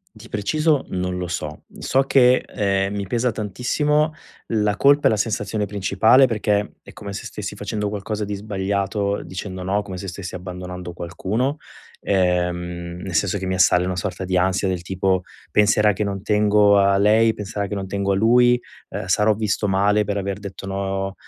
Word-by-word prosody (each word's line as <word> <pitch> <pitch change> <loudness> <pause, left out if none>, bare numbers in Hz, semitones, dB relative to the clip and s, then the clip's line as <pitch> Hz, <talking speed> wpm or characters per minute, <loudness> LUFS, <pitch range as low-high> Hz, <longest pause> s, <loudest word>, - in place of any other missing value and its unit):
di 110 +2 -13
preciso 150 +8 +1
non 90 0 -2
lo 90 - -4
so. 75 -3 -5
So 135 - +2
che, 130 -2 +5
ehm, 100 -1 0
mi 100 -1 -3
pesa 120 +4 0
tantissimo. 150 +9 0 0.3
La 105 -2 +1
colpa 140 +3 +4
è - - +6
la 110 - +1
sensazione 105 0 -1
principale 110 +6 +4
perché 105 -3 -1
è - - -13
come 100 -1 -8
se 100 - -6
stessi 100 -1 -6
facendo 105 0 -3
qualcosa 105 +1 -3
di 105 - -4
sbagliato 100 0 -2
dicendo: 95 0 -6
"No", 100 +3 0
come 95 -3 -7
se 100 - -6
stessi 95 0 -6
abbandonando 90 -1 -7
qualcuno. 105 - -2 0.4
Ehm, 90 -2 -1
nel 95 -3 -6
senso 100 +3 +1
che 95 - -5
mi 95 - -1
assale 90 0 +4
una 90 0 -2
sorta 90 +2 -3
di 90 0 -1
ansia 95 +2 +1
del 90 -2 -1
tipo: 95 0 0 0.3
"Penserà 105 0 +4
che 105 +3 -2
non 100 -1 -4
tengo 105 -1 +4
a 100 0 +4
lei, 110 +3 +4
penserà 100 0 -4
che 105 - -4
non 95 -1 -4
tengo 100 0 -1
a - - +2
lui, 120 +3 +4 0.3
ehm, - - -5
sarò 105 +1 +3
visto 105 -1 -1
male 100 +2 +2
per 100 0 -2
aver 100 0 -3
detto 100 -1 -8
no, 95 0 -3
100 Hz, 185 wpm, -22 LUFS, 95-105 Hz, 0.4 s, è